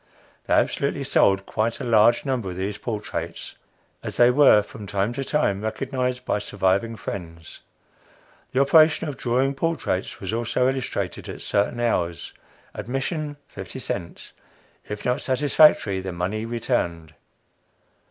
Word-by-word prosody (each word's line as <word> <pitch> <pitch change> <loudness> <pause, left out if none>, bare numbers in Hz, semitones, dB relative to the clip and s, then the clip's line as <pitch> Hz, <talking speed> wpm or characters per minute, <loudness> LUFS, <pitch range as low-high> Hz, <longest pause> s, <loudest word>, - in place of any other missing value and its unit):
They - - +3
absolutely - - 0
sold 95 0 +3
quite 115 +2 -1
a - - -5
large 115 +3 +4
number 125 -8 -1
of 90 - -6
these 100 +3 -4
portraits, 110 -3 -5 0.5
as - - -6
they 120 0 +6
were 125 -6 +6
from 105 0 -10
time 100 +4 -1
to 135 +2 -3
time 130 -9 0
recognized 125 +3 -2
by - - 0
surviving 100 +3 0
friends! 85 -6 -8 0.9
The 130 - +2
operation 155 +3 +5
of 145 - -4
drawing 130 +3 0
portraits 150 - -2
was 95 +1 -4
also 120 +2 +1
illustrated 130 -1 -3
at - - -7
certain 105 +4 0
hours, 85 -8 -1 0.4
admission, 145 +4 -3
fifty - - -8
cents; 85 -1 -6 0.6
if 105 0 -6
not 125 0 0
satisfactory, 130 -6 +4
the 95 0 -5
money 95 +6 -3
returned. 85 -9 -2
115 Hz, 135 wpm, -24 LUFS, 100-130 Hz, 0.9 s, they